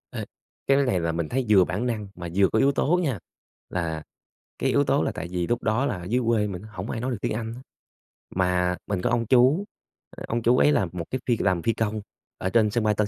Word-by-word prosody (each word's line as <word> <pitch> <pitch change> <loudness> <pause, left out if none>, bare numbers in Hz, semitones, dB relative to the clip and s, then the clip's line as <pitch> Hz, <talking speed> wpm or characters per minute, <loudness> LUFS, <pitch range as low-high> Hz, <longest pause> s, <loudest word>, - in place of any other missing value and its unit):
Ê, - - -5 0.4
cái 135 - +5
này 125 -10 +2
là 85 -1 0
mình 80 -1 -2
thấy 130 0 0
vừa 100 -3 +7
bản 90 +8 -2
năng 110 -4 -2
mà 85 -1 -6
vừa 95 0 +5
có 110 - +1
yếu 140 - +4
tố 165 +5 +2
nha, 130 - -1 0.5
là 80 -3 -3 0.6
cái - - +1
yếu 140 - +3
tố 140 +1 +2
là - - 0
tại 80 - -6
vì 90 -1 -1
lúc 120 - -1
đó 110 +5 +1
là 105 - -1
ở 90 - -8
dưới 120 +8 0
quê 110 -3 +2
mình 90 -3 -5
hổng 105 -2 -7
ai 115 - -3
nói 130 +1 -1
được 120 - -2
tiếng - - -1
Anh 115 +1 -4
á, 125 - -10 0.7
mà 90 -1 +1
mình 100 -3 -1
có - - +1
ông 120 -1 +1
chú, 130 - +4 0.5
ờ, - - -7
ông 120 +1 -1
chú 120 +2 +4
ấy 145 - +5
là 125 -10 +2
một 85 -2 -5
cái 130 - -2
phi 120 -2 +3
làm 95 -4 +1
phi 115 - +2
công 110 -1 -2 0.4
ở 95 - -2
trên 110 0 +3
sân 120 +1 0
bay 105 -1 +2
Tân 105 0 +1
110 Hz, 260 wpm, -25 LUFS, 90-125 Hz, 0.7 s, vừa